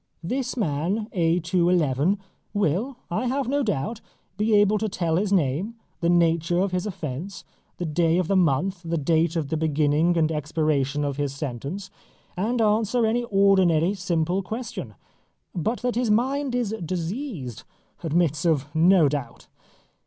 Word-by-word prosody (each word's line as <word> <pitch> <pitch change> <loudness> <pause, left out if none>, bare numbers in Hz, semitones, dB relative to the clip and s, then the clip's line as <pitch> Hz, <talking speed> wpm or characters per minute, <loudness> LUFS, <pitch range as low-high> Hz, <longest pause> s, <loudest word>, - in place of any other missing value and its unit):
This 255 +7 -2
man 185 - -1
A. 170 -1 +2
2. 175 +1 +1
11, 165 +2 +2 0.4
will, 205 - 0
I 250 +9 0
have 265 +1 -1
no 285 +3 +1
doubt, 210 - -2 0.3
be 215 +1 +2
able 205 +1 +4
to 220 +1 -1
tell 170 -4 0
his 200 +1 0
name, 180 - +1 0.2
the 170 - +1
nature 170 0 +2
of 190 +1 +1
his 180 +2 -1
offence, 170 0 -6 0.3
the 175 - -3
day 165 +1 +2
of 180 -3 0
the 195 - +1
month, 180 +2 +1
the 165 0 -2
date 165 +3 +1
of 155 -4 -1
the 160 - -1
beginning 155 +2 +2
and 160 -1 +2
expiration 150 -2 0
of 140 -1 -3
his 145 -2 -2
sentence, 145 - -5 0.4
and 225 +7 -1
answer 220 +2 +2
any 240 +2 +1
ordinary 190 -4 +3
simple 180 -1 0
question; 225 +6 -6 0.6
but 205 +7 -2
that 250 -1 +1
his 240 -1 0
mind 260 +4 +1
is 235 -4 -1
diseased 170 - -4 0.4
admits 160 -2 +1
of 150 -4 0
no 170 0 +5
doubt. 135 -5 -5
175 Hz, 155 wpm, -24 LUFS, 155-210 Hz, 0.6 s, no